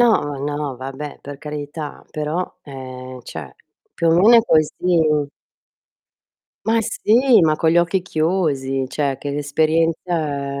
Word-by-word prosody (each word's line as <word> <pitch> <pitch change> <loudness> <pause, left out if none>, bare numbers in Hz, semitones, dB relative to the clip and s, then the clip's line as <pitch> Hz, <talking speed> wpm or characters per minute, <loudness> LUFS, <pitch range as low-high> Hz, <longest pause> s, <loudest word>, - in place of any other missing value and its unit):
No, 240 - +6
ma 145 -1 -4 0.2
no, 145 -4 -3
vabbè, 135 +3 -7
per 140 0 -8
carità, 150 0 -6
però, 155 +4 -3
ehm, 130 -2 -8
cioè, 70 - -8 0.4
più 165 - +1
o - - +5
meno 210 +7 +6
è 230 - +6
così. 155 -6 +3 2.0
Ma 225 +1 +3
sì, 230 +3 +4
ma 155 -2 +3
con 160 0 +2
gli 170 - +4
occhi 175 +2 +1
chiusi, 155 -6 0
cioè 140 0 -1
che 145 - -4
l'esperienza 155 -1 0
150 Hz, 135 wpm, -20 LUFS, 140-170 Hz, 2.0 s, No